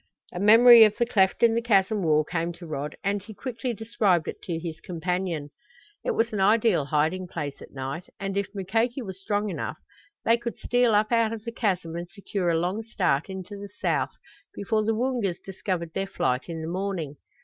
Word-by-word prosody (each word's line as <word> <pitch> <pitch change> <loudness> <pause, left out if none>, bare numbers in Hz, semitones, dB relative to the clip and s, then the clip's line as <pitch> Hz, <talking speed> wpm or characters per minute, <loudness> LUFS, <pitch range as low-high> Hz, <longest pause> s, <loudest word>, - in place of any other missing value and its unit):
A 175 - -4
memory 230 +3 +9
of 215 -1 +3
the 235 - +2
cleft 200 -3 +2
in 230 -1 +6
the 230 - +1
chasm 210 -2 +2
wall 155 -3 +3
came 170 +2 -2
to 170 +1 -11
Rod 150 -1 -4
and 200 +1 0
he 210 +2 -11
quickly 245 +1 -4
described 215 -6 +1
it - - -6
to 170 -3 -3
his 165 -1 -6
companion. 175 -3 -3 0.5
It - - -1
was 225 0 +1
an 210 - -1
ideal 210 -5 +3
hiding 160 +6 0
place 145 -5 -5
at - - -11
night, 135 +6 -6
and 195 -1 -3
if 200 -1 0
Mukoki 225 +7 0
was 190 -2 -8
strong 205 +1 -1
enough - - -4 0.5
they 230 +1 +5
could 235 0 -5
steal 245 -3 +2
up 215 +2 +2
out 230 -2 +3
of 225 0 -7
the 230 - -3
chasm 185 -8 -1
and 175 0 -5
secure 200 -3 -3
a 165 - +2
long 180 +6 -1
start 195 -9 0
into 190 +1 -7
the 200 0 -8
south - - 0 0.4
before 215 +2 0
the 220 +1 +1
Woongas 235 -7 -1
discovered 180 -3 -4
their 195 0 -2
flight 125 -7 -1
in 165 -1 -4
the - - -4
morning. 175 -5 -3
195 Hz, 205 wpm, -26 LUFS, 170-225 Hz, 0.5 s, memory